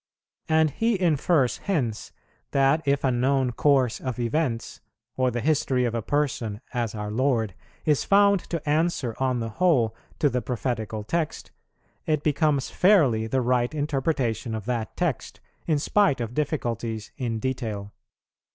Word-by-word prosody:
And 160 -1 +3
he 225 - 0
infers 155 -5 +2
hence, 130 - -2 0.4
that 140 +3 +3
if 140 0 +2
a 130 - +3
known 130 +1 +1
course 130 -2 +2
of 130 -3 -4
events, 120 0 -2 0.3
or 130 -1 +2
the 120 -1 -3
history 135 -4 +1
of 120 - -1
a 115 - -1
person 120 -6 -1
as 115 -3 -2
our 105 0 -4
Lord, 115 -4 +1 0.3
is 150 -3 +2
found 200 0 +4
to 165 -3 -4
answer 150 -5 +1
on 130 -2 0
the 115 - -3
whole 120 -6 +2 0.2
to 150 - +3
the 125 -3 0
prophetical 115 -4 -3
text, 160 +7 -3 0.6
it 155 -2 +1
becomes 150 -2 +1
fairly 145 - +4
the 130 +3 0
right 125 +3 +1
interpretation 135 -6 -1
of 110 -3 -6
that 115 -2 -3
text, 170 -8 -2 0.3
in 155 -3 +2
spite 175 -1 +2
of 115 -1 -4
difficulties 115 -7 -2
in 120 -3 -2
detail. 110 -4 -3
130 Hz, 150 wpm, -25 LUFS, 115-150 Hz, 0.6 s, found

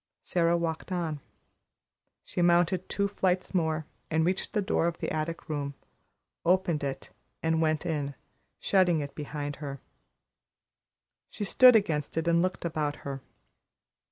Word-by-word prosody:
Sara 170 -1 +2
walked 165 +2 -3
on. 165 -5 -2 1.1
She - - -2
mounted 175 +1 +3
two 200 0 +1
flights 185 -2 0
more, 160 -3 0 0.2
and 160 0 +2
reached 185 +2 -1
the 210 - +2
door 180 -4 +1
of 170 0 -2
the - - -3
attic 155 +2 -3
room, 145 -3 -3 0.7
opened 175 -3 +2
it 135 -1 -4 0.3
and 160 0 +2
went 155 0 +1
in, 145 -4 -2 0.4
shutting 180 -5 +3
it 140 -1 -6
behind 145 -1 -5
her. 140 -2 -6 1.5
She 215 - -5
stood 250 +4 +7
against 160 -9 +1
it 165 +1 0
and 170 0 +4
looked 185 -1 -1
about 155 -3 -1
her. 135 -1 -4
165 Hz, 140 wpm, -29 LUFS, 150-180 Hz, 1.5 s, stood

